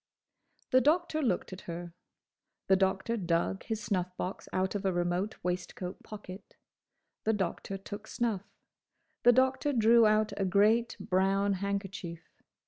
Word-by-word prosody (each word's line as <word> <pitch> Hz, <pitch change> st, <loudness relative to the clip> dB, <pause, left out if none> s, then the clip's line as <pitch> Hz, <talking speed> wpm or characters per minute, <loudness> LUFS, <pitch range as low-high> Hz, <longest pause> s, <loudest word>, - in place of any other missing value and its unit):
The 255 Hz, -, +6 dB
Doctor 310 Hz, +2 st, +2 dB
looked 195 Hz, -8 st, 0 dB
at 185 Hz, -, -8 dB
her. 170 Hz, 0 st, -6 dB, 0.7 s
The 190 Hz, -, +5 dB
Doctor 190 Hz, +4 st, +1 dB
dug 175 Hz, 0 st, 0 dB
his 220 Hz, -1 st, -3 dB
snuff 180 Hz, -3 st, -2 dB
box 185 Hz, -, -5 dB
out 185 Hz, 0 st, 0 dB
of 205 Hz, -1 st, -3 dB
a 190 Hz, -, +2 dB
remote 175 Hz, +4 st, -1 dB
waistcoat 180 Hz, +1 st, -4 dB
pocket. 200 Hz, -2 st, -10 dB, 0.7 s
The 220 Hz, -, +2 dB
Doctor 195 Hz, 0 st, -2 dB
took 205 Hz, +2 st, -8 dB
snuff. 225 Hz, -6 st, -1 dB, 0.8 s
The 245 Hz, -, +7 dB
Doctor 260 Hz, +3 st, +2 dB
drew 230 Hz, -1 st, +6 dB
out 215 Hz, 0 st, +2 dB
a 195 Hz, -, 0 dB
great, 215 Hz, +5 st, +3 dB
brown 195 Hz, +2 st, +2 dB
handkerchief. 195 Hz, -3 st, -4 dB
195 Hz, 135 wpm, -31 LUFS, 185-220 Hz, 0.8 s, The